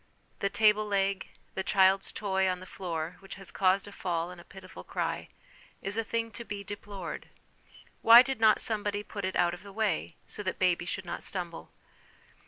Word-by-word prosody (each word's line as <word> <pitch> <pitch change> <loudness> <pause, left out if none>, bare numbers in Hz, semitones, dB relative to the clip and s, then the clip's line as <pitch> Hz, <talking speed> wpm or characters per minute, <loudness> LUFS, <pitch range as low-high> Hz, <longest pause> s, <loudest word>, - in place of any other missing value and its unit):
The 200 - +1
table 215 +1 +4
leg, 195 -1 0 0.3
the 190 - -2
child's 190 0 +4
toy 190 -2 +1
on 180 - 0
the 185 - -10
floor, 170 -3 -4
which 195 0 -9
has 195 -1 -9
caused 190 +1 +2
a - - -9
fall 175 -3 -2
and 180 -1 -10
a - - -15
pitiful 185 0 -11
cry, - - -3 0.5
is 195 +1 -2
a 225 - 0
thing 230 +1 -2
to 235 - -6
be 205 -3 -6
deplored; 200 -3 -7 0.7
why 235 +2 +10
did 265 -3 -3
not 220 -1 +6
somebody 205 -2 -1
put 200 -2 -5
it 190 - -2
out 175 0 +3
of 175 - -8
the 200 - -11
way, 195 -5 -1
so - - -6
that 190 -2 -1
the 185 - +2
baby 175 -1 +2
should 190 +2 -4
not 175 - -4
stumble 175 -3 -4
195 Hz, 195 wpm, -30 LUFS, 185-210 Hz, 0.7 s, why